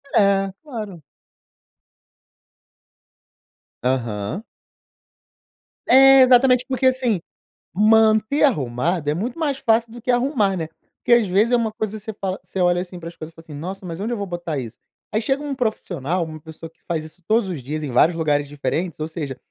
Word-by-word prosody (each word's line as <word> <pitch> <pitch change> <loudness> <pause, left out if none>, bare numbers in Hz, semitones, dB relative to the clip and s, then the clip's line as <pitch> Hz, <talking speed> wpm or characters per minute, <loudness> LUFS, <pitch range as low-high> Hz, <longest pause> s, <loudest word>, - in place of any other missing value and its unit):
É, 195 -1 +3
claro. 215 - -7 2.8
Aham. 120 - -2 1.4
É, 270 +1 +8
exatamente. 250 0 +5
Porque, 260 0 +1
assim, 255 -6 +1 0.6
manter 220 +5 +4
arrumado 150 - 0
é - - 0
muito 235 - -4
mais 290 -4 -1
fácil 230 -3 +1
do 240 - -10
que 250 - -1
arrumar 245 -6 +1
né? 160 -2 -3 0.3
Porque 240 - +4
às 220 - -2
vezes 205 +6 +2
é - - +6
uma 225 -2 -1
coisa 215 0 -4
que 210 - -15
você 220 - -5
fala 190 -1 -2
você - - -7
olha 175 0 +3
assim 180 -1 -9
pras 170 0 -9
coisas 160 +1 -9
e - - -42
fala 165 - -15
assim: 155 -3 -11
"Nossa, 190 +5 -6
mas 165 -1 -6
onde 220 +4 -2
eu 235 - -1
vou 200 - -4
botar 175 -4 -4
isso?". 120 -3 -7 0.3
Aí 215 - +1
chega 270 +5 -1
um 285 -2 -3
profissional, 185 - -2
uma 155 -1 -9
pessoa 160 +1 -10
que 165 - -39
faz 160 -2 -2
isso 160 +3 -14
todos 220 -2 +2
os 170 -6 -4
dias 150 +5 -4
em 145 - -4
vários 160 +7 +3
lugares 145 -3 +1
diferentes, 155 +4 -3
ou 155 - -2
seja, 150 -5 -5
195 Hz, 180 wpm, -21 LUFS, 160-235 Hz, 2.8 s, É